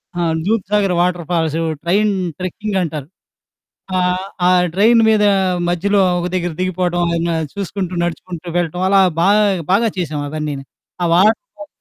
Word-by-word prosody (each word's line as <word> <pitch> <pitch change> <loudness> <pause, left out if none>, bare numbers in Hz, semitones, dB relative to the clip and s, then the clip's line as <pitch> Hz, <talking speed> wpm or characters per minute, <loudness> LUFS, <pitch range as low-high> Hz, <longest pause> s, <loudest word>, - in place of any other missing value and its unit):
ఆ! - - -3 0.3
దూద్ 220 -1 +1
Sagar 205 -3 +2
water 175 -1 0
falls 160 -1 0 0.2
train 205 +5 +2 0.3
trekking 195 +3 -3
అంటారు. 150 -5 -4 0.9
ఆహ్, 180 +1 0 0.2
ఆ - - +5 0.2
ట్రైన్ 225 +4 +4
మీద 215 -1 +3 0.5
మధ్యలో 195 +3 +1 0.2
ఒక 175 - -2
దగ్గర 175 -1 -1
దిగిపోవడం 180 -1 -1 0.2
ఏమైనా 170 0 -1 0.2
చూసుకుంటూ, 195 -2 -4
నడుచుకుంటూ 175 0 -5
వెళ్ళటం 175 +1 -1
అలా 195 0 +5 0.2
బాగా, 205 +4 +4 0.3
బాగా 225 +4 +3
చేశాం 155 -5 -3
అవన్నీను. 150 -2 -4 0.4
ఆ - - +2
వాటర్ 210 +5 +4 0.2
ఫాల్స్ 300 - -9
180 Hz, 140 wpm, -18 LUFS, 170-200 Hz, 0.9 s, ఆ